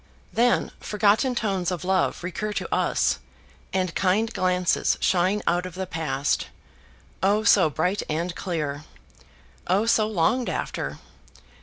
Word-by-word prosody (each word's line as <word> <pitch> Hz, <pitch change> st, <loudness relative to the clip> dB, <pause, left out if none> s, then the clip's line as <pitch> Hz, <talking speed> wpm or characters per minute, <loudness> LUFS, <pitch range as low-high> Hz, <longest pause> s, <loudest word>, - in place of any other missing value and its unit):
Then 240 Hz, +1 st, +2 dB
forgotten 215 Hz, +5 st, +2 dB
tones 195 Hz, -6 st, 0 dB
of 180 Hz, -4 st, -4 dB
love 190 Hz, -1 st, +1 dB
recur 210 Hz, +4 st, -3 dB
to -, -, -3 dB
us, -, -, +1 dB, 0.5 s
and 185 Hz, -3 st, -1 dB
kind 215 Hz, +5 st, +1 dB
glances 180 Hz, -2 st, +1 dB
shine 190 Hz, +3 st, +2 dB
out 175 Hz, +1 st, +1 dB
of 180 Hz, -, -11 dB
the 190 Hz, 0 st, -3 dB
past 150 Hz, -6 st, -1 dB, 0.7 s
oh 205 Hz, +3 st, +2 dB
so 195 Hz, -5 st, +5 dB
bright 180 Hz, +7 st, 0 dB
and 170 Hz, +3 st, -2 dB
clear! 155 Hz, -5 st, -3 dB, 0.8 s
oh 195 Hz, +5 st, +2 dB
so 220 Hz, -2 st, +3 dB
longed 220 Hz, +5 st, +1 dB
after! -, -, -3 dB
185 Hz, 130 wpm, -25 LUFS, 175-210 Hz, 0.8 s, so